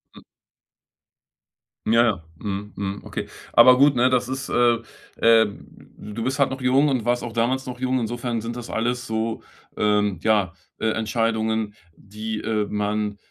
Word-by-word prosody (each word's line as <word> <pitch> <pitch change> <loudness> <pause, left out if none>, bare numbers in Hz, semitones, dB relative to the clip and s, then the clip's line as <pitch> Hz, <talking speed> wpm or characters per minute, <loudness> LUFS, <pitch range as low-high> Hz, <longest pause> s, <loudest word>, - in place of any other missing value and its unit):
Mhm. - - -13 1.7
Ja, 115 +2 +5
ja. 100 -8 0
Mhm. 100 0 -5
Mhm. 100 0 -4
Okay, - - -5 0.3
aber 125 +2 +8
gut, 140 +1 +5
ne, 125 +1 +4
das 125 -1 +1
ist, 130 +1 -4
äh, 120 -1 +4 0.4
äh 115 -1 +5
d 105 +1 -13
du 115 +2 -4
bist 130 +4 -1
halt 140 -1 +4
noch 130 0 -5
jung 135 +4 +3
und 130 -5 -1
warst 120 0 +1
auch 120 - -5
damals 125 +3 0
noch 125 -1 -7
jung. 130 0 0
Insofern 120 0 -3
sind 115 +2 -5
das 120 -1 -7
alles 120 +2 -2
so, 110 0 -2 0.4
ähm, 105 -2 +1
ja, 105 -5 +2 0.3
äh, 110 - +1
Entscheidungen, 110 -1 -1 0.2
die, 110 +2 -6
äh, 110 -2 0
man, 105 0 -2
115 Hz, 165 wpm, -23 LUFS, 105-125 Hz, 1.7 s, aber